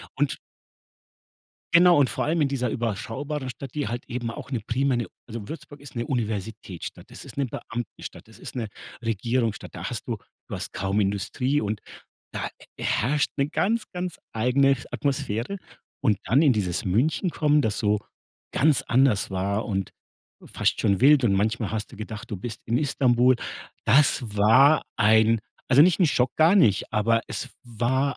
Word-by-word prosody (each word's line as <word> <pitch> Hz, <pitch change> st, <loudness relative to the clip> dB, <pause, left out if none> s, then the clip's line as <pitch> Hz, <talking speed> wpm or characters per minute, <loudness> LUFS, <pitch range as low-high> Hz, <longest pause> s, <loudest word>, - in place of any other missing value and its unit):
und 145 Hz, 0 st, 0 dB, 1.4 s
Genau 175 Hz, -1 st, +7 dB
und 140 Hz, -, +4 dB
vor -, -, -2 dB
allem 160 Hz, +2 st, +1 dB
in 140 Hz, -, +3 dB
dieser 125 Hz, -4 st, -1 dB
überschaubaren 130 Hz, +5 st, -3 dB
Stadt, 135 Hz, 0 st, -9 dB
die 150 Hz, -2 st, -1 dB
halt 120 Hz, +1 st, -4 dB
eben 120 Hz, -1 st, -3 dB
auch 115 Hz, -, -9 dB
'ne 125 Hz, -4 st, -1 dB
primäre 130 Hz, +2 st, +1 dB
'ne -, -, -6 dB, 0.2 s
also, 115 Hz, -3 st, -7 dB
Würzburg 150 Hz, -2 st, -9 dB
ist 140 Hz, -3 st, -13 dB
'ne 120 Hz, 0 st, -2 dB
Universitätsstadt, 110 Hz, -, -4 dB
das -, -, -10 dB
ist -, -, -11 dB
'ne 140 Hz, -, +1 dB
Beamtenstadt, 120 Hz, -1 st, -7 dB
das -, -, -17 dB
ist -, -, -9 dB
'ne 115 Hz, -3 st, -2 dB, 0.4 s
Regierungsstadt, 115 Hz, 0 st, -1 dB
da -, -, -7 dB
hast -, -, -5 dB
du -, -, -1 dB, 0.3 s
du -, -, -5 dB
hast -, -, -5 dB
kaum 95 Hz, +2 st, -1 dB
Industrie 105 Hz, +8 st, 0 dB
und 105 Hz, 0 st, -3 dB, 0.5 s
da -, -, -3 dB, 0.3 s
herrscht 140 Hz, +6 st, +1 dB
'ne 140 Hz, 0 st, +1 dB
ganz, 215 Hz, +7 st, 0 dB
ganz 180 Hz, -1 st, -4 dB, 0.2 s
eigene 130 Hz, +4 st, +3 dB
Atmosphäre. 140 Hz, -, -2 dB, 0.4 s
Und 110 Hz, -7 st, +2 dB
dann 135 Hz, +6 st, +3 dB
in 145 Hz, -5 st, +5 dB
dieses 100 Hz, 0 st, -1 dB
München 130 Hz, -, +1 dB
kommen, 150 Hz, -2 st, +3 dB
das 110 Hz, -6 st, -1 dB
so 105 Hz, 0 st, +2 dB, 0.5 s
ganz 150 Hz, 0 st, +3 dB
anders 125 Hz, -6 st, +2 dB
war 100 Hz, +3 st, -1 dB
und 95 Hz, -3 st, -2 dB, 0.6 s
fast -, -, 0 dB
schon 100 Hz, -1 st, +2 dB
wild 145 Hz, 0 st, +7 dB
und 100 Hz, -4 st, +3 dB
manchmal 110 Hz, +2 st, 0 dB
hast 110 Hz, -1 st, -4 dB
du -, -, -11 dB
gedacht, 110 Hz, +1 st, -7 dB
du 105 Hz, -, -3 dB
bist 110 Hz, +3 st, -6 dB
in 115 Hz, +2 st, +1 dB
Istanbul. 130 Hz, -3 st, +3 dB, 0.5 s
Das 140 Hz, +2 st, +4 dB
war 130 Hz, +9 st, +6 dB
ein 110 Hz, +1 st, +4 dB, 0.3 s
also, 135 Hz, +4 st, +8 dB
nicht 180 Hz, +3 st, +4 dB
'n 180 Hz, -, +6 dB
Schock, 125 Hz, -4 st, +1 dB
gar 165 Hz, +5 st, +5 dB
nicht, 110 Hz, -, +3 dB
aber 115 Hz, +2 st, +3 dB
es 130 Hz, -, -5 dB
war 125 Hz, +3 st, 0 dB
120 Hz, 170 wpm, -25 LUFS, 110-140 Hz, 1.4 s, also